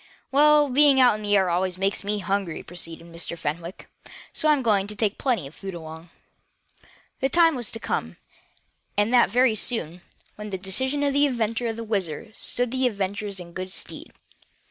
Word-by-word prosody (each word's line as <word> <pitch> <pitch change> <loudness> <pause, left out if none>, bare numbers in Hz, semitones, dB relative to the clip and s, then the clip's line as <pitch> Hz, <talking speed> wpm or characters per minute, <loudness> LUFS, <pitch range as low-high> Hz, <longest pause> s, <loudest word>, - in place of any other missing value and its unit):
"Well, 295 +1 +5
being 280 +1 +5
out 250 -3 +6
in 215 - -5
the 205 -1 +2
air 190 -1 +2
always 180 +1 0
makes 195 +2 -1
me 205 +1 0
hungry," 195 -3 -2
proceeded 165 -1 -3
Mr. 170 0 -6
Fenwick, 170 +5 -5 0.5
"so 310 - +1
I'm 290 -3 +3
going 205 -4 +2
to 210 - -7
take 210 -1 -1
plenty 240 - 0
of 135 - -10
food 195 0 -7
along." 160 0 -9 1.1
The 270 - +1
time 330 +2 +5
was 245 -5 -2
to 225 - -4
come, - - -3 0.8
and 205 +4 +2
that 245 - +5
very 245 +2 +3
soon, 180 -6 -1 0.4
when 210 0 -7
this 190 -2 -4
decision 260 +10 0
of 285 -1 +1
the 285 +1 +4
inventor 235 -2 -1
of 225 - -2
the 230 - -6
WHIZZER 205 -2 -3
stood 245 +2 -1
the 260 0 +2
adventurers 200 -2 -3
in 170 -1 -10
good 185 +1 -5
stead. - - -7
210 Hz, 190 wpm, -24 LUFS, 185-250 Hz, 1.1 s, out